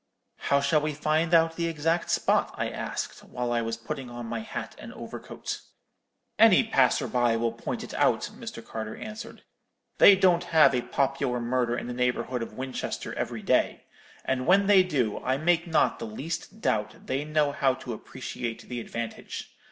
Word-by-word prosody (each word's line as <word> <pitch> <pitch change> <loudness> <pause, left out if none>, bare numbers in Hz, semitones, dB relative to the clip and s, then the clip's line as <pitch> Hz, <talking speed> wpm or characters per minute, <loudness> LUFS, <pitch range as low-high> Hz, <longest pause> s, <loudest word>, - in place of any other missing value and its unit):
"'How 140 0 +1
shall 150 +2 +3
we 150 -1 -2
find 155 +2 +1
out 165 -1 +4
the 170 -1 0
exact 165 +1 0
spot?' - - +2
I - - -1
asked, - - -5
while 125 -1 -3
I 120 0 +1
was 115 0 -3
putting 130 +2 -6
on 120 0 -7
my 115 0 -3
hat 110 - -6
and - - -9
overcoat. - - -6 0.8
"'Any - - +7
passer - - +2
by 120 -2 +2
will 115 0 0
point - - -5
it - - -8
out,' - - +1
Mr. - - -8
Carter 110 -1 -5
answered; 215 +1 -8 0.6
'they 200 - +9
don't 180 -2 +3
have 155 -5 +5
a 125 - +1
popular 135 -1 0
murder 120 0 0
in - - -4
the 125 - -4
neighbourhood 125 0 -1
of 115 - -7
Winchester 130 0 -4
every - - -4
day; - - +1 0.4
and 130 -1 -1
when 195 +3 +5
they 195 -1 +7
do, 135 - 0
I 130 +1 +1
make 170 +3 +2
not 160 -2 +2
the 115 - -5
least 165 - -6
doubt 105 0 -1
they 135 +2 -1
know 150 -1 +1
how 135 -2 +2
to 125 - -6
appreciate 120 0 -6
the 125 -1 -3
advantage. 115 0 -6
135 Hz, 180 wpm, -27 LUFS, 120-160 Hz, 0.8 s, they